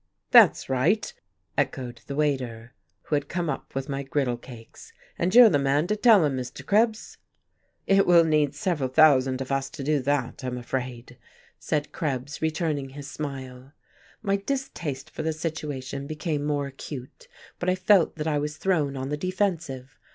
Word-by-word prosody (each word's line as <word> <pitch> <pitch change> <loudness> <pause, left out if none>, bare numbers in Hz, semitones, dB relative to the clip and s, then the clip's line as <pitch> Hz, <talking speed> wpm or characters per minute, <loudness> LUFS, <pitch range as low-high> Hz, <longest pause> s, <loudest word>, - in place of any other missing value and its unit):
"That's - - +7
right!" 140 +12 +1 0.4
echoed 125 -3 -2
the 140 - -4
waiter, 125 -6 -2 0.3
who - - -6
had 145 -1 -2
come 170 -3 -1
up 135 - -7
with 135 0 -3
my 140 -1 -3
griddle 135 -2 -1
cakes. 120 -1 -13 0.3
"And 185 +5 0
you're 245 -1 +10
the 145 - +3
man 140 +3 +2
to 210 +4 0
tell 210 -5 +6
'em, 140 -2 0
Mr. 125 0 -7
Krebs." 220 +1 +1 0.7
"It 195 0 +4
will 170 -1 +7
need 150 -3 +1
several 145 -4 -1
thousand 135 -3 +4
of 135 - -5
us 135 0 -1
to 140 - -8
do 150 +1 +1
that, 140 +1 -1
I'm 125 -1 -3
afraid," 125 -1 -5 0.4
said 150 -1 -2
Krebs, 145 -2 -4
returning 155 -3 -1
his 140 +1 -9
smile. 135 -2 -7 0.5
My 200 -2 +1
distaste 195 - -4
for - - -5
the 160 0 -1
situation 145 -4 -5
became 155 -1 -3
more 145 -1 0
acute, 135 -1 -9 0.3
but 180 - 0
I 185 - +2
felt 185 -1 +3
that 155 -2 -4
I 150 -2 +1
was 150 +1 -4
thrown 155 -7 0
on 130 +1 -4
the 150 - -2
defensive. 165 -7 -3
145 Hz, 170 wpm, -26 LUFS, 135-165 Hz, 0.7 s, you're